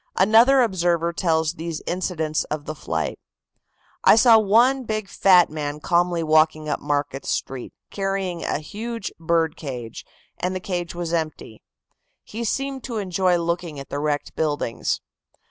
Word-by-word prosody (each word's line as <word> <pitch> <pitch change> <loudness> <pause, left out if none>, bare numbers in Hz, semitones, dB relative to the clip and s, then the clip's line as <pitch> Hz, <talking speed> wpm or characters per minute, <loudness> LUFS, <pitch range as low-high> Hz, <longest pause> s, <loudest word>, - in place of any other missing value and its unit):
Another 230 +7 +6
observer 175 -5 0
tells 160 -2 +1
these 165 -2 -5
incidents 160 -4 -1
of 150 -1 -5
the 155 - -4
flight: 80 - -3 0.8
"I - - +7
saw 225 0 +7
one 240 +6 +3
big 215 -3 -3
fat 185 -3 +4
man 150 -1 -4
calmly 175 +1 +1
walking 155 0 +3
up 150 - -1
Market 145 -1 -2
Street, 130 -2 -3 0.2
carrying 195 -3 -2
a - - -1
huge 225 +8 -6
bird 165 -1 +1
cage, 125 -6 -7 0.4
and 185 +1 -2
the - - -2
cage 175 -2 -4
was 175 -1 -4
empty. 155 -9 -4 0.6
He 230 +2 -6
seemed 270 +3 -2
to 235 -4 -4
enjoy 185 -2 +1
looking 170 -3 -3
at 135 - -9
the 140 - -3
wrecked 145 -1 -2
buildings. 145 -6 -1
170 Hz, 145 wpm, -23 LUFS, 155-195 Hz, 0.8 s, I